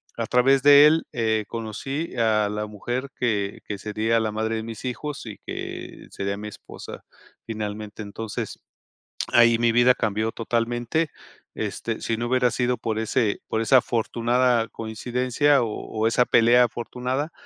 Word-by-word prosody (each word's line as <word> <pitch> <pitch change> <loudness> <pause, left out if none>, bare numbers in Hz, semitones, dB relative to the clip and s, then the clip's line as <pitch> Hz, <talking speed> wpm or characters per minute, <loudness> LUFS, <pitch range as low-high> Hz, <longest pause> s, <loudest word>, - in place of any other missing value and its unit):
a 115 -1 -3
través 130 +2 +4
de 145 +1 +8
él, 160 +2 +3
eh, 110 -2 0
conocí 125 +9 -5
a 110 -2 +2
la 105 0 -3
mujer 120 +6 -4
que 105 -5 -1
que 100 - -4
sería 110 +2 0
la 110 -1 -1
madre 110 +1 -1
de 110 - -3
mis 115 +2 -8
hijos 140 +4 -4
y 110 -3 -8
que - - -7
sería 100 0 -3
mi 105 - -6
esposa 105 - -10 0.4
finalmente, 105 -1 -5
entonces, 105 +1 -6 0.7
ahí 115 -1 +6
mi 115 0 +3
vida 120 +1 +6
cambió 110 -1 -1
totalmente, 120 +7 -1 0.5
este, - - -3
si 115 - -1
no 120 - -2
hubiera 125 -1 +2
sido 125 +1 0
por 110 -1 -2
ese 110 -1 0
por 110 - -1
esa 120 +4 +5
afortunada 120 0 +1
coincidencia 125 +5 0
o 115 - -1
o 110 +1 -2
esa 120 +2 +3
pelea 120 +2 +5
afortunada, 125 +6 -3
115 Hz, 155 wpm, -24 LUFS, 110-125 Hz, 0.7 s, de